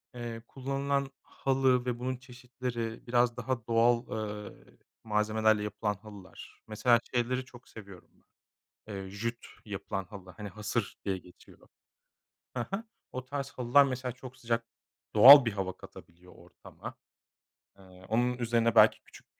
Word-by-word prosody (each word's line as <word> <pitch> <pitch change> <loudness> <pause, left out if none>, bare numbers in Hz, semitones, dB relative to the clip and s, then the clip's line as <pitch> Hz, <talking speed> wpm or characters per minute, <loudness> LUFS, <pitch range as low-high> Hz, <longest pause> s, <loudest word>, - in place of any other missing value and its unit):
eee, 120 -1 -6
kullanılan 140 +1 -2
halı 130 -2 +1
ve 120 -1 -2
bunun 130 +1 -2
çeşitleri 125 -2 -6
biraz 120 0 +2
daha 125 -4 -3
doğal, 120 +1 +3 0.5
eee, - - -22 0.3
malzemelerle 110 0 +2
yapılan 105 0 -2
halılar 100 -1 -13
mesela 115 +2 +3
şeyleri 125 +1 0
çok 125 -1 -16
seviyorum 100 -5 -12
ben. - - -36 0.5
Eee, 95 -1 -6
jüt 115 +4 -4 0.2
yapılan 95 - -4
halı 95 -1 -11
hani 105 +3 -8
"hasır" 105 +1 -3
diye 95 -2 -1
geçiyor. 90 -1 -19 0.9
Hı 120 - -2
hı. 195 +4 -3 0.3
O 130 0 -5
tarz 140 +1 -4
halılar 125 +3 +4
mesela 130 -2 -3
çok 125 +1 -11
sıcak 115 -1 -2 0.5
doğal 135 +6 +11
bir 115 - -1
hava 95 -2 -4
katabiliyor 90 0 -15
ortama. - - -12 0.8
Eee, 95 - -17 0.2
onun 120 +3 +1
üzerine 115 -1 +1
belki - - +6
küçük, - - -17
120 Hz, 135 wpm, -30 LUFS, 105-125 Hz, 0.9 s, doğal